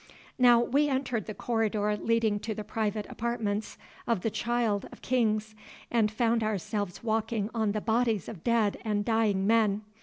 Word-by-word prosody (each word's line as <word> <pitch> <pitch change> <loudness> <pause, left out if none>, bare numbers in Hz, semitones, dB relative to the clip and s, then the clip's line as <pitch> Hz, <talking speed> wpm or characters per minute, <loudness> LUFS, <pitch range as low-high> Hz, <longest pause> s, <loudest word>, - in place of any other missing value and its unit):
Now 245 -2 +7
we 285 +5 +2
entered 250 -6 -1
the 215 - -5
corridor 215 -3 0
leading 220 -1 +1
to 220 +1 -4
the 215 - -5
private 215 0 -2
apartments 220 -3 -3 0.3
of 230 -6 +1
the 225 - -1
Child 230 -3 -1
of - - -14
Kings, 220 -4 +1 0.4
and 225 -3 +3
found 230 +1 +1
ourselves 205 -2 -3
walking 220 -1 -1
on 220 -3 0
the 215 - -2
bodies 225 -3 +1
of 180 -7 -8
dead 230 -3 +2
and 205 -2 -1
dying 215 -4 +2
men. 215 -1 +3
220 Hz, 160 wpm, -29 LUFS, 210-235 Hz, 0.4 s, Now